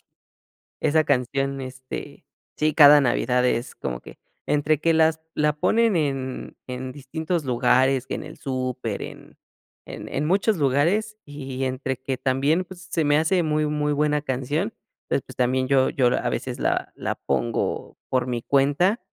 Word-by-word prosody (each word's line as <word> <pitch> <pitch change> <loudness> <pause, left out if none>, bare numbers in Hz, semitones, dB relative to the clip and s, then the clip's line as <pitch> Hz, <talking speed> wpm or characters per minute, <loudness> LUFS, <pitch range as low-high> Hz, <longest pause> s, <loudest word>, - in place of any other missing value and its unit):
Sí. - - -40 0.8
Esa 155 +1 +3
canción, 135 0 0
este, 130 0 -8 0.3
sí, 155 0 +1
cada 145 -1 +8
Navidad, 125 -1 +2
es 120 -1 -1
como - - -4
que, - - -13 0.3
entre 150 0 +2
que 165 - +3
las 160 0 +3 0.2
la 150 0 +2
ponen 225 +6 +2
en 135 -5 -2
en 130 0 -5
distintos 155 +4 -3
lugares, 130 +1 +2
que - - -3
en - - -5
el 155 +1 -10
súper, 130 -5 -3
en - - -10 0.5
en - - -8
en 145 - -2
muchos 195 +5 +2
lugares. 160 +10 +1
Y 135 -2 -6
entre 130 0 -2
que 130 0 -3
también, 135 +7 +1
pues, 180 0 -12
s 185 - -15
se 165 - +1
me 145 0 +3
hace 170 +3 +2
muy, 155 -1 +1
muy 150 0 0
buena 150 0 +1
canción. 145 - -2 0.4
Entonces, 140 - 0
pues, - - -12
también 130 +1 +1
yo 130 -1 +3
yo, 130 -3 +2
a 120 - +1
veces, - - -4
la - - 0
la - - -3
pongo 115 +12 -2
por 130 -1 +1
mi 120 -2 -2
cuenta, 145 - +2
140 Hz, 170 wpm, -24 LUFS, 130-155 Hz, 0.8 s, cada